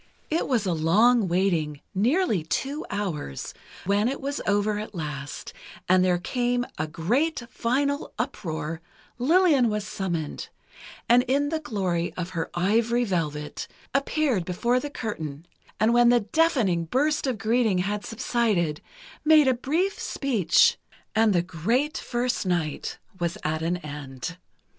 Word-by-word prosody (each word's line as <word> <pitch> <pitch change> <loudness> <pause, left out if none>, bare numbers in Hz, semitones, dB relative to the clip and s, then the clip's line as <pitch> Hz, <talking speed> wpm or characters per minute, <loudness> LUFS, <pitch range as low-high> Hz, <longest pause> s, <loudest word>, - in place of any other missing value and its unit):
It 325 - +1
was 240 -6 +1
a 180 - +1
long 205 +8 +4
waiting, 170 -5 0
nearly 230 - +2
two 270 - -2
hours, 165 - -4 0.3
but 200 +3 +2
it 270 +2 -2
was 280 +1 -3
over 205 +1 +1
at 215 -1 -7
last, 150 -3 -5 0.3
and 185 0 +5
there 180 -1 +3
came 245 +5 0
a 155 - 0
great 240 - 0
final 280 +5 0
uproar, 165 - -3 0.4
Lillian 295 -3 +4
was 210 -1 -2
summoned, 175 -8 -4 0.6
and 240 +1 +6
in 285 +3 +2
the 320 0 -1
glory 190 - -2
of 180 0 -4
her 165 -3 -3
ivory 230 +7 +2
velvet, 150 -8 -2 0.3
appeared 275 - +1
before 235 +8 +1
the 290 - -5
curtain, 160 - -5 0.3
and 220 +2 +3
when 240 0 +6
the 240 -1 +5
deafening 215 - +2
burst 290 - +1
of 255 -4 -1
greeting 220 -1 +2
had 205 +3 -1
subsided, 210 -9 0 0.4
made 305 -2 +6
a 260 - +5
brief 320 +11 -1
speech, 275 - +2 0.3
and 220 0 +4
the 175 -3 +2
great 225 - 0
first 245 0 -1
night 175 -5 -2 0.2
was 170 -1 -1
at 155 +1 -1
an 170 +2 0
end. 150 +1 -7
210 Hz, 140 wpm, -26 LUFS, 170-250 Hz, 0.6 s, and